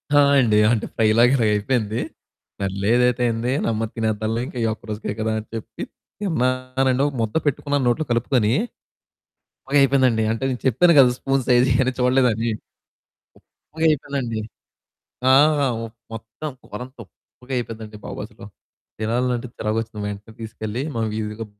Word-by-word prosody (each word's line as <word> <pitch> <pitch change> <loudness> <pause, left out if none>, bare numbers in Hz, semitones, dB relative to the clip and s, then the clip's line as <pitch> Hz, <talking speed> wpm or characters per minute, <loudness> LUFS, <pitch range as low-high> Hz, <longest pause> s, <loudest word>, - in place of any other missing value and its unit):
ఆ! - - +7 0.2
అండి. 110 -5 +3
అంటే 115 -3 0
ఫ్రై 110 - +3
లాగా 120 +2 +6
ఇలాగపోయింది 110 0 0 0.6
సర్లేదైతే 115 +6 +1
ఏంది 115 +2 -2
నెమ్మది 115 -1 -1
తినేద్దాంలే 110 0 -1
ఇంకా - - -9
ఈ - - +1
ఒక్క - - -15
రోజుకే 105 -1 -4
కదా! 110 0 0
అని 110 - -10
చెప్పి 110 - -7 0.4
తిన్నానండి. 130 -6 0
ఒక 145 - -4
ముద్ద 110 -1 -2
పెట్టుకున్నాను 145 -1 0
నోట్లో 140 +6 +1
కలుపుకొని. 115 -2 +2 1.1
ఉప్పగయిపోయిందండి 135 -4 +3
అంటే 115 +3 -3
నేను 125 -2 -3
చెప్పాను 170 +8 +5
గదా 130 -3 +7
స్పూన్ 135 0 0
సైజు 125 0 +5
ఇయన్ని 130 +1 +2
చూడలేదని. 125 -3 +2 1.2
ఉప్పగయిపోయిందండి. 140 -7 0 0.9
ఆ! - - +6 0.5
ఉప్ 115 0 -12 0.2
మొత్తం 115 +7 -7 0.2
కూర 105 - -6
అంతా 130 0 -18
ఉప్పుగయిపోయిందండి 115 -2 -7
బాబు - - -6
అసలు. - - -13 0.5
తినాలంటే 120 +2 -1
చిరాకు 110 +1 -2
వచ్చింది 110 -2 -8
మా 105 - -2
ఇంటికి 105 +2 -16
తీసుకెళ్ళి, 110 +1 -5
మా 115 - -1
వీదిలో 110 +1 -4
120 Hz, 135 wpm, -22 LUFS, 110-130 Hz, 1.2 s, ఆ